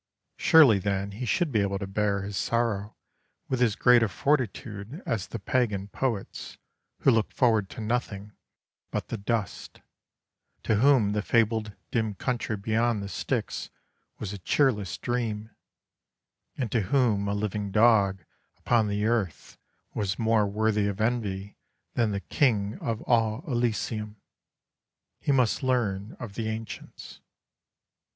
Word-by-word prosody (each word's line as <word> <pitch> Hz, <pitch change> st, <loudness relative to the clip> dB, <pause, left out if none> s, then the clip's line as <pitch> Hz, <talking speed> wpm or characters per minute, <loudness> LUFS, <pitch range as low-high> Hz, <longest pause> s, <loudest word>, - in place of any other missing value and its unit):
Surely 140 Hz, -11 st, +6 dB
then 100 Hz, +1 st, -2 dB
he 115 Hz, +6 st, -5 dB
should 170 Hz, +5 st, +1 dB
be 110 Hz, -, +2 dB
able 100 Hz, 0 st, 0 dB
to 100 Hz, -, -4 dB
bear 100 Hz, 0 st, 0 dB
his 100 Hz, +1 st, -5 dB
sorrow 110 Hz, -2 st, -1 dB, 0.5 s
with 130 Hz, -1 st, -1 dB
as 115 Hz, -5 st, +3 dB
great 125 Hz, -1 st, +5 dB
a 115 Hz, -, +2 dB
fortitude 125 Hz, -, -2 dB
as 105 Hz, -5 st, -2 dB
the -, -, -5 dB
pagan 105 Hz, -2 st, -1 dB
poets, 115 Hz, -3 st, -3 dB, 0.4 s
who 135 Hz, -, +5 dB
looked 110 Hz, -3 st, +1 dB
forward 110 Hz, -6 st, +2 dB
to -, -, -8 dB
nothing 105 Hz, -3 st, -2 dB, 0.6 s
but -, -, -4 dB
the 115 Hz, -, -3 dB
dust; 110 Hz, -1 st, -3 dB, 0.8 s
to 110 Hz, -, +2 dB
whom 120 Hz, -4 st, +4 dB
the 105 Hz, 0 st, 0 dB
fabled 110 Hz, -1 st, +1 dB, 0.2 s
dim 110 Hz, -3 st, 0 dB
country 115 Hz, 0 st, -2 dB
beyond 110 Hz, +1 st, 0 dB
the -, -, -5 dB
Styx 100 Hz, -, -3 dB, 0.5 s
was 105 Hz, -1 st, -5 dB
a 100 Hz, -, -7 dB
cheerless 105 Hz, -3 st, +1 dB
dream, 115 Hz, -3 st, -3 dB, 1.1 s
and 125 Hz, -5 st, -2 dB
to 115 Hz, -, +2 dB
whom 105 Hz, -1 st, +2 dB
a 100 Hz, -, 0 dB
living 105 Hz, 0 st, -2 dB
dog 100 Hz, -3 st, +3 dB, 0.3 s
upon 115 Hz, -3 st, +2 dB
the 105 Hz, +1 st, -1 dB
earth 110 Hz, -8 st, -2 dB, 0.3 s
was 95 Hz, -3 st, -2 dB
more 110 Hz, -2 st, +2 dB
worthy 105 Hz, 0 st, +1 dB
of 100 Hz, 0 st, -3 dB
envy 105 Hz, -4 st, -2 dB, 0.3 s
than 115 Hz, -2 st, +1 dB
the 100 Hz, -1 st, -2 dB
King 110 Hz, -8 st, +1 dB
of 115 Hz, -1 st, -3 dB
all 115 Hz, -2 st, +1 dB
Elysium. 115 Hz, -4 st, -1 dB, 1.0 s
He -, -, 0 dB
must 125 Hz, -5 st, +2 dB
learn 110 Hz, -6 st, -1 dB
of 120 Hz, -5 st, -7 dB
the 110 Hz, +1 st, -3 dB
ancients. 110 Hz, 0 st, -8 dB
110 Hz, 140 wpm, -27 LUFS, 100-120 Hz, 1.1 s, Surely